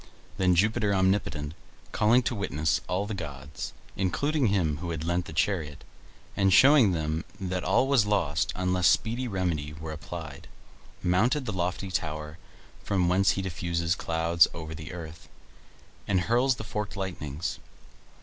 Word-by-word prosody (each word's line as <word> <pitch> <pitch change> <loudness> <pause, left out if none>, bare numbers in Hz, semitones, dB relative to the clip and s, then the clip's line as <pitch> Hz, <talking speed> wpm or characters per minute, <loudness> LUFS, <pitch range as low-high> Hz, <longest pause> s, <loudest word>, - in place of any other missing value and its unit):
Then 90 -2 +4
Jupiter 105 +2 +2
omnipotent, 95 -6 0 0.4
calling 115 +4 +4
to 120 - -1
witness 80 - 0
all 95 +3 0
the 110 - -4
gods, 75 -5 -6 0.2
including 140 - +1
him 85 -7 +1
who 85 +2 -5
had 80 -2 -3
lent 85 +1 0
the - - -8
chariot, 80 -2 -1 0.5
and 95 -1 +3
showing 130 -1 +7
them 80 -1 -1 0.2
that 90 -1 -3
all 130 - +3
was 130 -7 +3
lost 80 -8 +1
unless 90 0 +2
speedy 120 +3 +1
remedy 85 -8 -2
were 80 +1 -7
applied, 75 -1 -8 0.6
mounted 120 - +2
the 110 - -3
lofty 90 +1 -2
tower 75 -2 -3 0.4
from 90 -3 +1
whence 95 +2 +4
he 95 - -3
diffuses 85 -2 -1
clouds 85 0 +3
over 80 -1 -6
the 80 0 -8
earth, 85 -2 -9 0.8
and 95 -3 +2
hurls 120 +7 +2
the 110 - -7
forked 105 -1 -4
lightnings. 85 -5 -4
90 Hz, 150 wpm, -28 LUFS, 80-100 Hz, 0.8 s, showing